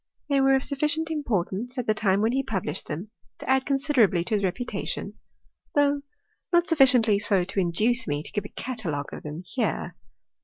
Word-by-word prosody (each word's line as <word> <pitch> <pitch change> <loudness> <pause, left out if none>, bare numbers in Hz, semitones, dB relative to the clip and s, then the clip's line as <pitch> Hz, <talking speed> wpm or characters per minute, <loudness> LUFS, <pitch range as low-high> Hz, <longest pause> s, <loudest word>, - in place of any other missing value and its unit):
They 280 -1 +3
were 270 0 +5
of 265 - 0
sufficient 300 +3 0
importance, 245 - -2
at 250 - -2
the 215 - +2
time 200 -2 +1
when 220 +2 +2
he 265 +2 +1
published 190 - -3
them, 175 +8 -6 0.3
to - - -10
add 265 0 +2
considerably 270 - +2
to 180 - -4
his 205 -1 +1
reputation, 195 +7 -3 0.6
though 285 0 +3 0.5
not 345 -1 +4
sufficiently 250 -10 +5
so 200 -3 +3
to 195 +2 -3
induce 215 +8 +2
me 145 0 -2
to - - -6
give 205 -1 -3
a - - -7
catalogue 175 - -4
of - - -7
tliem 150 +4 -7
here. 250 - -2
230 Hz, 185 wpm, -26 LUFS, 190-270 Hz, 0.6 s, were